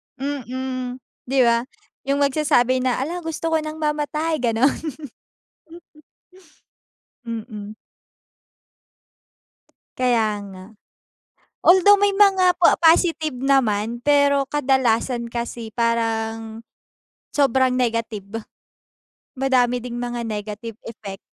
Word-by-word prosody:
Mm, 260 -2 -4 0.3
di 270 +2 +1
ba? 235 0 +2 0.4
Yung 280 +1 +2
magsasabi 275 -3 +2
na, 255 -1 0
hala 340 +5 -4
gusto 325 -1 -4
ko 320 - +3
ng 310 0 -6
mamatay, 305 +1 -1
gano'n. 240 +2 +1 2.5
Mm. 215 -2 -7 2.2
Kaya 225 -5 +1
nga. 185 0 -11 0.9
Although 380 +3 +6
may 405 -1 +2
mga 380 -3 +4
po 350 - +5
positive 325 -3 +3
naman, 240 -4 +1
pero 280 0 +3
kadalasan 255 -4 +1
kasi 235 -1 -6
parang, 225 -1 -1 0.7
sobrang 265 -2 +2
negative. 225 -3 -2 0.9
Madami 250 -2 +1
ding 240 -1 -6
mga 240 0 -4
negative 215 0 -6
effect, 205 -4 -8
250 Hz, 90 wpm, -22 LUFS, 230-290 Hz, 2.5 s, Although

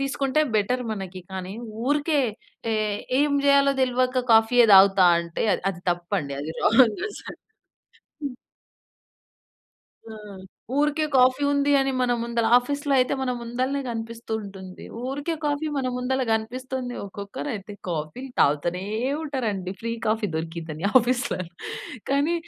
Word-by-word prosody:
తీసుకుంటే 275 +1 0 0.2
బెటర్ 250 +5 +1
మనకి. 190 -2 -6
కానీ, 190 +1 -5 0.3
ఊరికే 295 +1 +2 0.5
టే 225 - +1 0.5
ఏం 295 -1 +2
చేయాలో 280 0 +5
తెల్వక 255 0 +1
కాఫీయే 225 +2 +6
తాగుతా 195 -1 +7 0.2
అంటే 170 -1 -4
అది - - -2
అది 175 -2 -10
తప్పండి. 175 -4 -2
అది 150 - -5
రాంగ్ 225 -1 +4
అసలు. - - -10 0.8
హ్మ్. 275 -3 -3 1.8
ఆ! - - -7 0.6
ఊరికే 300 +1 +2
కాఫీ 255 +2 +4
ఉంది 285 0 +2
అని, 270 0 +1
మన 245 -1 +2
ముందల 235 -1 0
ఆఫీస్‌లో 285 +3 0
అయితే 255 - +2
మన 260 -1 -1
ముందలనే 255 +4 -2
కనిపిస్తూ 230 -1 -6
ఉంటుంది. 190 -2 -10 0.2
ఊరికే 285 +5 -2
కాఫీ 295 +1 0
మన 265 -2 -1
ముందల 260 +1 -1
కనిపిస్తుంది. 250 +3 -2
ఒక్కొక్కరు 200 +8 -6
అయితే 205 0 -8 0.2
కాఫీలు 175 - -4
తాగుతూనే 170 +6 +2 0.4
ఉంటారండి. 220 - -3
ఫ్రీ 230 0 -3
కాఫీ 215 0 +1
దొరికిందని 165 0 -5
ఆఫీస్‌లో. 255 +3 -1 0.7
కానీ 285 +5 +2
245 Hz, 125 wpm, -24 LUFS, 195-275 Hz, 1.8 s, తాగుతా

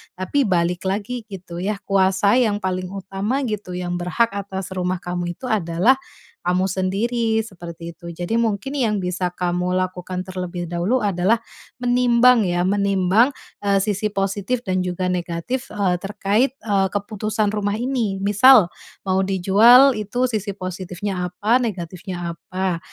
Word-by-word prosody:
Tapi 210 +9 0
balik 180 0 0
lagi 215 +4 -3
gitu 185 -4 -8
ya, 205 +4 -1
kuasa 195 +3 +3
yang 215 -5 +2
paling 185 -1 -2
utama 195 +7 -3
gitu, 210 -6 -4
yang 175 -1 -3
berhak 210 +6 +1
atas 195 -1 -5
rumah 185 0 -1
kamu 175 0 -3
itu - - -27
adalah 215 +4 +2 0.4
kamu 180 +1 +1
sendiri, 220 +4 0
seperti 170 -4 -9
itu. 170 +1 -10
Jadi 180 +7 -1
mungkin 225 +3 -1
yang 230 -7 +1
bisa 180 0 -1
kamu 180 0 -1
lakukan 185 0 -2
terlebih 180 -1 -5
dahulu 190 +9 0
adalah, 200 +3 +2 0.4
menimbang 245 -1 +4
ya, 175 0 0
menimbang, 200 +5 +2 0.3
eee, 200 -1 +2
sisi 210 0 0
positif 200 +5 -1
dan 185 -3 0
juga 180 0 -2
negatif, 180 +9 -3
eee, 195 -4 +1
terkait, 210 +6 0
eee, 200 -3 +2
keputusan 210 +1 -1
rumah 205 -1 -1
ini. 230 -5 -1
Misal, 205 0 +6 0.4
mau 190 0 +1
dijual, 215 +8 +6
itu 245 +5 -1
sisi 210 -2 -2
positifnya 185 0 -4
apa, 205 +7 +2
negatifnya 175 -4 -4
apa. 185 +1 -3
195 Hz, 140 wpm, -21 LUFS, 180-220 Hz, 0.4 s, Misal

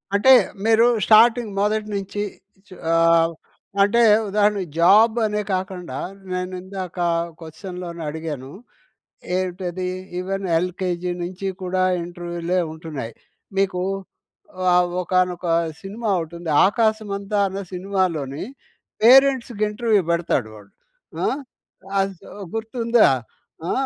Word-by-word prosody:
అంటే, 265 +6 +5 0.3
మీరు 225 +1 +5 0.2
స్టార్టింగ్ 225 0 +5
మొదటి 215 +1 0
నుంచి 200 +1 -4 0.5
చి 185 - -13 0.2
ఆవ్ 165 0 +4 0.5
అంటే 225 +4 +4 0.3
ఉదాహరణకి 205 -2 +1
జాబ్ 215 +6 +6
అనే 210 0 -1
కాకుండా, 185 -1 -4 0.3
నేను 180 0 -3
ఇందాక 190 -1 -7 0.4
క్వశ్చన్‌లోని 170 +1 -8
అడిగాను. 150 -4 -6 0.9
ఏంటది? 180 0 -3 0.3
ఈవెన్ 195 +1 -3
ఎల్‍కేజీ 180 0 -2
నుంచి 185 +2 -4
కూడా 185 0 0 0.2
ఇంటర్వ్యూలే 175 +1 -3
ఉంటున్నాయి. 155 -8 -7 0.5
మీకు 185 -2 0 0.9
ఆహ్, 180 0 +3
ఒకానొక 180 0 0 0.4
సినిమా 210 +3 -4
ఓటుంది. 170 0 -7 0.2
'ఆకాశమంతా' 205 -2 0
అన్న 195 +1 -5
సినిమాలోని 180 -7 -2 0.6
పేరెంట్స్‌కి 255 -3 +5
ఇంటర్వ్యూ 210 -1 +2
పెడతాడు 170 -9 0
వాడు. 100 -1 -15 0.5
ఆ! - - +2 0.7
ఆసు 195 -2 -1 0.3
గుర్తుందా? 230 - +2 0.6
ఆ! - - +1
185 Hz, 100 wpm, -22 LUFS, 175-210 Hz, 0.9 s, జాబ్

